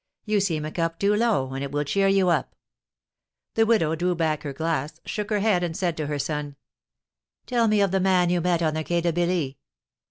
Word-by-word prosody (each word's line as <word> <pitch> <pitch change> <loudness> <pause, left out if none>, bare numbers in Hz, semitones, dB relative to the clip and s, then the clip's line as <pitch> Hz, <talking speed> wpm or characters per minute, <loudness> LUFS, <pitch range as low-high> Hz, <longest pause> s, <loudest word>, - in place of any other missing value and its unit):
You 210 -2 +2
seem 165 -6 -1
a 155 - -5
cup 165 0 -2
too 200 +3 +2
low, 210 - +1
and 135 +1 -3
it 140 - -5
will 145 0 0
cheer 195 +7 +1
you 195 -2 +3
up." 170 - 0 1.0
The 225 0 +3
widow 195 -9 +3
drew 175 +2 0
back 160 -3 0
her 145 - -5
glass, 155 0 -2
shook 210 0 -4
her 210 -2 +1
head, 200 -4 +2
and 165 -2 -3
said 175 -3 -1
to 155 -2 -2
her 145 0 -2
son: 145 0 -3 0.9
"Tell 235 -2 +1
me 210 -1 +3
of 200 -2 +2
the 190 - +2
man 180 -2 +3
you 175 -1 +1
met 170 -1 +1
on 155 -1 +1
the 155 0 -2
Quai 170 +2 0
de 170 -1 0
Billy." 175 -5 -1
175 Hz, 225 wpm, -25 LUFS, 155-195 Hz, 1.0 s, you